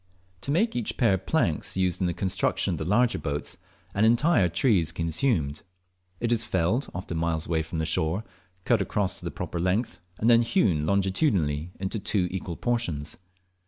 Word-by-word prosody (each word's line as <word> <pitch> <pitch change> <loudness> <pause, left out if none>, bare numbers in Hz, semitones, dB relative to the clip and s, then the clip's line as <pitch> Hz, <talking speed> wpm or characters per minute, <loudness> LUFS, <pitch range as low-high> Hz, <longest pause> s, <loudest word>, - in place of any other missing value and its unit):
To - - -6
make 195 +11 +2
each 120 -3 -2
pair 115 -5 +4
of 95 0 -3
planks 95 - 0
used 95 0 0
in 90 - +2
the 85 - -1
construction 95 -1 0
of - - -4
the 80 - -3
larger 120 +7 +2
boats 75 -1 -3 0.4
an 100 - +1
entire 120 - +4
tree 100 +5 +3
is 80 -3 0
consumed. 80 - 0 0.6
It 120 0 -1
is 115 -1 +3
felled, 95 +7 0
often 85 -2 -4
miles 80 -1 -1
away 80 -1 0
from 80 +1 -6
the 80 - 0
shore, 80 +5 0 0.4
cut 120 -4 +3
across 95 0 -1
to - - -11
the - - -1
proper 85 - -5
length, 90 +2 0 0.2
and 110 - 0
then 120 -1 +7
hewn 95 - +1
longitudinally 95 - +1
into 95 +3 -2
two 95 -2 0
equal 90 -2 -4
portions. 100 -12 -1
95 Hz, 185 wpm, -26 LUFS, 85-115 Hz, 0.6 s, then